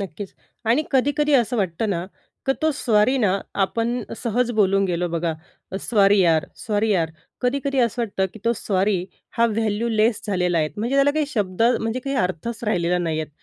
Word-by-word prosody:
नक्कीच. 195 +1 -7 0.3
आणि 235 +7 +3
कधी-कधी 290 +2 +2
असं 245 -1 +2
वाटतं 200 +2 -1
ना, 175 -1 -1 0.4
की 270 - +4
तो 315 - +3
सॉरी 230 +2 +2
ना, 200 -4 +2 0.3
आपण 235 +4 -2 0.2
सहज 240 +1 0
बोलून 195 0 +3
गेलो 175 -1 -1
बघा, 165 0 -1 0.4
अ, - - -2
सॉरी 205 -3 +3
यार, 165 -3 +3 0.2
सॉरी 215 0 +1
यार. 165 -4 +1 0.3
कधी-कधी 275 +2 0
असं 240 +1 +1
वाटतं, 195 -4 -1
की - - -11
तो 235 - +3
सॉरी 190 -2 0 0.3
हा 235 - +5
व्हॅल्यूलेस 220 0 +1
झालेला 180 -4 +1
आहे, 155 -1 +1
म्हणजे 235 +6 -1
त्याला 275 +1 +5
काही 305 0 0
शब्द 205 -6 -1 0.2
म्हणजे 225 +3 -2
काही 275 +1 -3
अर्थच 185 +5 -2
राहिलेला 180 -4 +1
नाही 160 -2 -1
आहे. 155 - -5
210 Hz, 180 wpm, -22 LUFS, 185-240 Hz, 0.4 s, हा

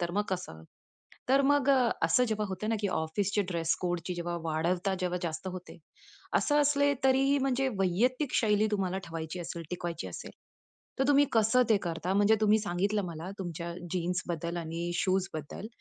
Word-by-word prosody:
तर 175 -1 -1
मग - - +3
कसं? 175 - -5 0.7
तर 270 +1 +5
मग 285 0 +3
अ, 255 -4 +4
असं 165 +10 +4
जेव्हा 215 -3 -1
होत 190 +1 -5
ना 225 - +2
की 205 - 0
ऑफिसचे 195 +5 0
ड्रेस-कोडची 175 +1 -1
जेव्हा 175 0 -3
वाढवता, 175 +4 0
जेव्हा 180 0 -1
जास्त 170 +1 -4
होते. 180 -2 -9 0.6
असं 295 - +2
असले 285 0 +3
तरीही 270 +2 +4
म्हणजे 270 0 +1
वैयक्तिक 245 - +1
शैली 215 -1 +3
तुम्हाला 190 -2 0
ठेवायची 165 +1 -5
असेल, 170 0 -6
टिकवायची 175 -1 -4
असेल. - - -8 0.7
तर 265 - +2
तुम्ही 285 0 +6
कसं 225 +3 +4
ते 220 - +5
करता 175 +1 -2
म्हणजे 205 +2 +5
तुम्ही 215 0 +4
सांगितलं 205 +1 0
मला 170 +2 -6
तुमच्या 170 -2 -5 0.2
जीन्सबद्दल 175 -1 -2
आणि 170 +1 -3
शूजबद्दल. 185 -2 -2
185 Hz, 160 wpm, -30 LUFS, 170-220 Hz, 0.7 s, तुम्ही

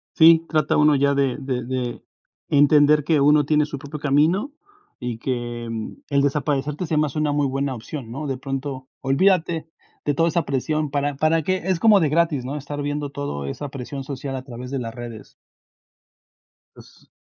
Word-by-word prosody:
Sí, 165 -1 +7
trata 155 -3 +1
uno 150 0 +5
ya 140 0 +2
de 135 -3 +1
de 130 -3 -3
de 125 -1 -3 0.5
entender, 145 +1 +5
que 150 0 +2
uno 150 +1 +5
tiene 150 0 +3
su 145 -1 -6
propio 145 +3 -7
camino. 155 - +2 0.5
Y 120 -2 -3
que 120 -1 -3 0.5
el 140 -1 +3
desaparecerte 145 +2 -1
se 155 - -1
me 150 0 +3
hace 150 +1 -5
una 150 -1 +1
muy 145 -1 +1
buena 135 0 -1
opción, 120 0 -7
¿no? 145 +4 -5
De 135 - -1
pronto, 135 0 -5
olvídate 165 +3 +2 0.4
de 145 - +1
toda 165 +4 +2
esa 170 0 0
presión. 150 +2 -1
¿Para 145 0 -1
para 155 +3 +2
qué? 185 +5 +1
Es 185 -2 0
como 215 -2 +6
de 160 -5 +2
gratis, 155 -3 +1
¿no? 135 +3 -4
Estar 145 0 -5
viendo 145 0 -3
todo 140 - -4
esa 145 - -5
presión 135 +1 -6
social, 135 0 -5
a 130 - -6
través 125 -1 -8
de 135 - -2
las 115 -2 -5
redes. 120 -3 -9 1.4
Pues - - -18
145 Hz, 185 wpm, -22 LUFS, 135-150 Hz, 1.4 s, Sí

